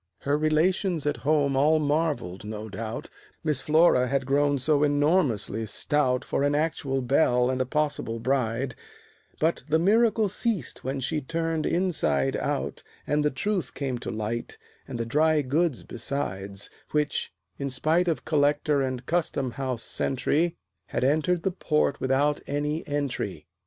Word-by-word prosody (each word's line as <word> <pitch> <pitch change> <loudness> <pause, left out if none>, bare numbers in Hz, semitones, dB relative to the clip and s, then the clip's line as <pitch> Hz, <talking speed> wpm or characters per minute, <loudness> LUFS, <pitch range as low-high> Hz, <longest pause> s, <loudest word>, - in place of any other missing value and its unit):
Her 140 +1 +1
relations 160 +2 +1
at 145 -1 0
home 145 -1 +2
all 150 +4 +4
marveled, 145 - -1
no 105 +1 -6
doubt, 110 +3 -6 0.3
Miss 150 -4 0
Flora 155 -5 +4
had 135 0 0
grown 145 +1 +2
so 145 +2 +2
enormously 145 - +2
stout 130 +3 +1
For - - -1
an 145 +1 +2
actual 145 -4 -1
belle 125 -1 +3
and 130 0 -1
a 130 - -1
possible 150 -6 -1
bride; 125 0 0 0.7
But 160 +2 +1
the 160 - +4
miracle 215 +4 +3
ceased 205 - -2
when 135 +1 -2
she 150 +4 -1
turned 165 +2 -1
inside 155 - +1
out, - - -2 0.2
And 150 0 +1
the 150 - +3
truth 185 +7 -2
came 130 -4 -2
to - - -5
light, 110 +2 -4 0.3
and 120 - -5
the 115 - -1
dry 150 +4 +3
goods 150 +1 0
besides, 100 -6 -4 0.2
Which, 150 -1 0 0.3
in 140 -1 -2
spite 155 +7 +1
of 165 - -1
Collector 145 -1 +2
and 130 -1 -3
Custom 155 -6 0
House 130 -2 -3
sentry, 160 +6 0 0.3
Had - - -2
entered 160 +5 +2
the 190 - +1
port 150 -5 0
without 140 +3 +1
any 150 +2 -1
entry. 145 -2 -3
145 Hz, 150 wpm, -26 LUFS, 130-155 Hz, 0.7 s, all